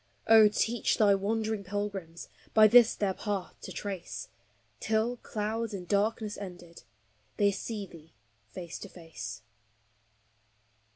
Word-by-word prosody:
Oh, 220 Hz, -1 st, +8 dB
teach 225 Hz, +3 st, 0 dB
thy 205 Hz, -2 st, +5 dB
wandering 215 Hz, +1 st, -1 dB
pilgrims 195 Hz, -4 st, -5 dB, 0.3 s
By 215 Hz, -1 st, +8 dB
this 230 Hz, +1 st, +7 dB
their 200 Hz, -2 st, 0 dB
path 200 Hz, -2 st, -4 dB
to -, -, -8 dB
trace, 195 Hz, -4 st, -6 dB, 0.5 s
Till, 220 Hz, +3 st, 0 dB
clouds 220 Hz, 0 st, -3 dB
and 180 Hz, -2 st, -7 dB
darkness 210 Hz, +1 st, 0 dB
ended, 175 Hz, -3 st, -10 dB, 0.6 s
They 200 Hz, -1 st, +4 dB
see 205 Hz, +1 st, -5 dB
thee 165 Hz, -3 st, -15 dB, 0.3 s
face 170 Hz, -, -8 dB
to 200 Hz, -, -9 dB
face. 160 Hz, -, -8 dB
205 Hz, 120 wpm, -30 LUFS, 185-220 Hz, 0.6 s, Oh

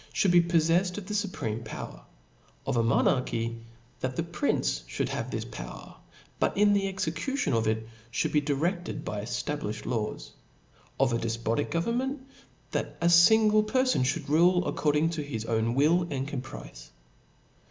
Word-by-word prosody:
ihould 190 Hz, -, +3 dB
be 175 Hz, 0 st, +7 dB
poflefTed 170 Hz, +2 st, +2 dB
of 205 Hz, -, -6 dB
the 210 Hz, -, -5 dB
fupreme 185 Hz, -, -2 dB
power: 110 Hz, -, -7 dB, 0.6 s
of -, -, -1 dB
a 115 Hz, -, +3 dB
monarchy, 115 Hz, 0 st, +1 dB, 0.4 s
that 130 Hz, 0 st, -3 dB
the 165 Hz, -, 0 dB
prince 170 Hz, -, -1 dB
(hould -, -, 0 dB
have -, -, -3 dB
this -, -, -3 dB
power, -, -, -9 dB, 0.4 s
but -, -, +1 dB
in 205 Hz, 0 st, +5 dB
the 195 Hz, -1 st, +1 dB
execucioii 190 Hz, -, -1 dB
of 110 Hz, -1 st, +1 dB
it 110 Hz, 0 st, -1 dB, 0.2 s
ihould -, -, 0 dB
be 150 Hz, -, +3 dB
direfted 165 Hz, +6 st, -2 dB
by 105 Hz, -, -4 dB
eftaUifhed 110 Hz, -1 st, -4 dB
laws: 110 Hz, -4 st, -3 dB, 0.7 s
of 130 Hz, -3 st, +3 dB
a 115 Hz, -, +1 dB
defpotic 115 Hz, 0 st, -1 dB
government, 255 Hz, -, -1 dB, 0.5 s
that -, -, -3 dB
a 170 Hz, 0 st, +3 dB, 0.2 s
(ingle 215 Hz, -1 st, +5 dB
perfon 255 Hz, -, +2 dB
ihould 140 Hz, +4 st, -1 dB
rule 175 Hz, +4 st, +4 dB
according 150 Hz, +2 st, +1 dB
to 160 Hz, -2 st, -3 dB
his 115 Hz, -7 st, -5 dB
own 115 Hz, +1 st, 0 dB
will 165 Hz, +5 st, +3 dB
and 135 Hz, -2 st, -2 dB
caprice. -, -, -8 dB
150 Hz, 155 wpm, -28 LUFS, 115-185 Hz, 0.7 s, be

